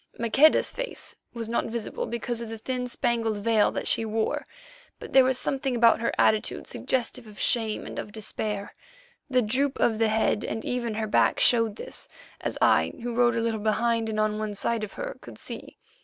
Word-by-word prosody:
Maqueda's 265 Hz, +7 st, +4 dB
face -, -, -6 dB, 0.2 s
was 230 Hz, -2 st, -5 dB
not 235 Hz, -, 0 dB
visible 225 Hz, -1 st, -4 dB
because 235 Hz, 0 st, -3 dB
of 230 Hz, -, -6 dB
the 225 Hz, -, -5 dB
thin 250 Hz, +2 st, -3 dB
spangled 235 Hz, -3 st, 0 dB
veil 215 Hz, 0 st, +3 dB
that -, -, -3 dB
she -, -, +3 dB
wore, 220 Hz, 0 st, -1 dB, 0.5 s
but -, -, -10 dB
there 265 Hz, -, +8 dB
was 260 Hz, 0 st, +2 dB
something 265 Hz, 0 st, -1 dB
about 235 Hz, -1 st, +5 dB
her 235 Hz, -, +1 dB
attitude 215 Hz, -1 st, +2 dB
suggestive 250 Hz, -1 st, -2 dB
of 210 Hz, -1 st, -13 dB
shame 225 Hz, -3 st, +1 dB
and -, -, -6 dB
of 205 Hz, -, -6 dB
despair. 210 Hz, -1 st, -4 dB, 0.6 s
The 255 Hz, -2 st, +3 dB
droop 265 Hz, +6 st, 0 dB
of 220 Hz, -2 st, +2 dB
the 225 Hz, -1 st, +3 dB
head 220 Hz, -1 st, +1 dB
and 220 Hz, -, -4 dB
even 240 Hz, -3 st, -2 dB
her 220 Hz, 0 st, -1 dB
back 210 Hz, -, +3 dB
showed 230 Hz, -3 st, +3 dB
this, -, -, -6 dB, 0.3 s
as -, -, -3 dB
I, -, -, +4 dB
who 240 Hz, 0 st, -3 dB
rode 240 Hz, 0 st, +3 dB
a 230 Hz, -, +1 dB
little 225 Hz, -1 st, -1 dB
behind 225 Hz, +1 st, +1 dB
and 215 Hz, -1 st, -2 dB
on 215 Hz, 0 st, -1 dB
side 225 Hz, +2 st, 0 dB
of 210 Hz, -, -5 dB
her, -, -, -5 dB
could -, -, -11 dB
see. -, -, -8 dB
230 Hz, 195 wpm, -26 LUFS, 215-245 Hz, 0.6 s, there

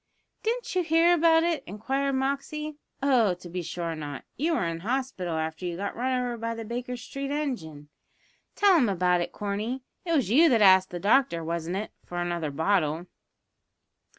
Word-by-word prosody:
"Didn't 475 Hz, +2 st, -2 dB
you 365 Hz, -, +2 dB
hear 330 Hz, +1 st, +4 dB
about 325 Hz, -1 st, +5 dB
it?" 335 Hz, -2 st, 0 dB
inquired 265 Hz, +8 st, -1 dB
Moxey. 285 Hz, +3 st, -2 dB, 0.2 s
"Oh, 240 Hz, -9 st, +4 dB
to 175 Hz, 0 st, -12 dB
be 180 Hz, +1 st, -4 dB
sure 170 Hz, 0 st, -4 dB
not; 145 Hz, -3 st, -6 dB
you 320 Hz, +4 st, 0 dB
were 195 Hz, -, 0 dB
in 165 Hz, 0 st, -3 dB
hospital 215 Hz, -6 st, -2 dB
after 160 Hz, +2 st, -3 dB
you 175 Hz, -1 st, -3 dB
got 200 Hz, +2 st, -4 dB
run 255 Hz, +1 st, 0 dB
over 245 Hz, -1 st, -2 dB
by 230 Hz, 0 st, -3 dB
the 225 Hz, 0 st, -6 dB
Baker 245 Hz, +2 st, -4 dB
Street 275 Hz, +3 st, -6 dB
engine. 225 Hz, -, -4 dB, 0.7 s
Tell 400 Hz, -2 st, +5 dB
him 245 Hz, -8 st, +3 dB
about 180 Hz, -2 st, +2 dB
it, -, -, -3 dB
Corney. 210 Hz, +6 st, -3 dB, 0.2 s
It 335 Hz, -, -1 dB
was 265 Hz, -, +1 dB
you 320 Hz, +7 st, +6 dB
that 235 Hz, -, +4 dB
asked 190 Hz, -1 st, +6 dB
the 175 Hz, -, -5 dB
doctor, 200 Hz, -4 st, +3 dB
wasn't 170 Hz, +2 st, -3 dB
it, 210 Hz, -, -4 dB
for 175 Hz, -, -7 dB
another 175 Hz, -3 st, -2 dB
bottle?" 160 Hz, +1 st, 0 dB
225 Hz, 180 wpm, -27 LUFS, 175-275 Hz, 0.7 s, you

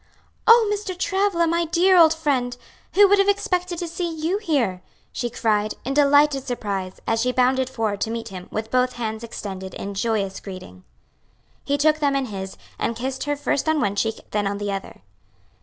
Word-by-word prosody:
"Oh, 460 Hz, -1 st, +7 dB
Mr. 400 Hz, -3 st, -4 dB
Travilla, 385 Hz, -2 st, +1 dB
my 335 Hz, +1 st, +1 dB
dear 350 Hz, +3 st, +3 dB
old 330 Hz, -3 st, +7 dB
friend! 260 Hz, -6 st, -1 dB, 0.4 s
who 405 Hz, +1 st, +8 dB
would 405 Hz, +1 st, +4 dB
have 395 Hz, -, +4 dB
expected 360 Hz, -3 st, 0 dB
to 345 Hz, -, -3 dB
see 340 Hz, +1 st, -3 dB
you 325 Hz, +5 st, -1 dB
here?" 255 Hz, -, 0 dB, 0.3 s
she 240 Hz, -, -3 dB
cried, 215 Hz, -3 st, 0 dB
in 270 Hz, -, -1 dB
delighted 285 Hz, -1 st, +4 dB
surprise, 200 Hz, -6 st, -4 dB
as 225 Hz, 0 st, +1 dB
she 250 Hz, +2 st, +1 dB
bounded 255 Hz, +1 st, +2 dB
forward 220 Hz, -5 st, -2 dB
to -, -, 0 dB
meet 230 Hz, 0 st, -4 dB
him, 185 Hz, -2 st, -9 dB
with 220 Hz, +1 st, -4 dB
both 255 Hz, 0 st, +2 dB
hands 220 Hz, -1 st, -4 dB
extended 190 Hz, -4 st, -7 dB
in 200 Hz, -, -5 dB
joyous 200 Hz, -2 st, -1 dB
greeting. 185 Hz, -, -10 dB, 0.8 s
He 285 Hz, -, 0 dB
took 305 Hz, +1 st, +3 dB
them 285 Hz, -2 st, +1 dB
in 275 Hz, -1 st, 0 dB
his, 190 Hz, -4 st, -6 dB, 0.2 s
and 230 Hz, -, -1 dB
kissed 260 Hz, +3 st, -4 dB
her 290 Hz, 0 st, 0 dB
first 285 Hz, +1 st, -1 dB
on 315 Hz, -1 st, +2 dB
one 200 Hz, -5 st, 0 dB
cheek, 225 Hz, +2 st, -1 dB
then 205 Hz, -1 st, 0 dB
on 200 Hz, 0 st, -2 dB
the 205 Hz, 0 st, -3 dB
other. 195 Hz, -, -6 dB
255 Hz, 190 wpm, -23 LUFS, 210-325 Hz, 0.8 s, who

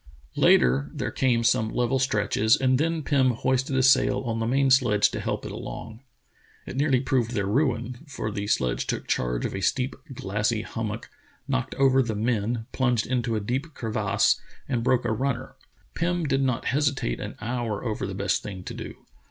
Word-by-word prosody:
" -, -, -29 dB
Later 65 Hz, +3 st, +4 dB
there -, -, -2 dB
came 120 Hz, -3 st, +1 dB
some 110 Hz, -2 st, +2 dB
level 125 Hz, +3 st, 0 dB
stretches, 110 Hz, -3 st, +2 dB
and 130 Hz, -1 st, +2 dB
then 165 Hz, 0 st, 0 dB
Pirn 135 Hz, -3 st, +3 dB
hoisted 130 Hz, +3 st, 0 dB
a 130 Hz, -, +3 dB
sail 130 Hz, +1 st, +4 dB
on 115 Hz, -3 st, -2 dB
the 115 Hz, -, -1 dB
man 135 Hz, +2 st, +2 dB
sledge 115 Hz, -6 st, +4 dB
to -, -, -4 dB
help -, -, -3 dB
it -, -, -5 dB
along. 110 Hz, 0 st, -7 dB, 0.7 s
It -, -, -7 dB
nearly 135 Hz, -2 st, +2 dB
proved 125 Hz, -3 st, 0 dB
their 100 Hz, -3 st, 0 dB
ruin, 120 Hz, +1 st, 0 dB
for 115 Hz, -6 st, -4 dB
the 100 Hz, 0 st, -4 dB
sledge 65 Hz, -, 0 dB
took -, -, -2 dB
charge -, -, -1 dB
on -, -, -3 dB
a 95 Hz, -, -3 dB
steep, 130 Hz, +7 st, 0 dB, 0.2 s
glassy 105 Hz, -1 st, -1 dB
hummock, 110 Hz, 0 st, -5 dB, 0.4 s
knocked 130 Hz, -2 st, -1 dB
over 135 Hz, -1 st, +4 dB
the 115 Hz, -4 st, -2 dB
men, 110 Hz, +1 st, -1 dB
plunged 125 Hz, -4 st, +1 dB
into 120 Hz, -2 st, -1 dB
a -, -, +1 dB
deep 130 Hz, +9 st, -3 dB
crevasse, 110 Hz, -2 st, +1 dB, 0.3 s
and 120 Hz, -3 st, -1 dB
broke 125 Hz, 0 st, +2 dB
a 115 Hz, -, +1 dB
runner. 125 Hz, +2 st, -2 dB, 0.4 s
Pirn 175 Hz, +1 st, 0 dB
did 135 Hz, -3 st, +1 dB
not 130 Hz, -3 st, 0 dB
hesitate 140 Hz, -, 0 dB
an -, -, -6 dB
hour 115 Hz, -2 st, -3 dB
over 110 Hz, -4 st, -2 dB
the 95 Hz, -, -5 dB
best 100 Hz, +1 st, 0 dB
thing 95 Hz, -3 st, -7 dB
to -, -, -6 dB
do. -, -, -9 dB
120 Hz, 190 wpm, -26 LUFS, 110-130 Hz, 0.7 s, Later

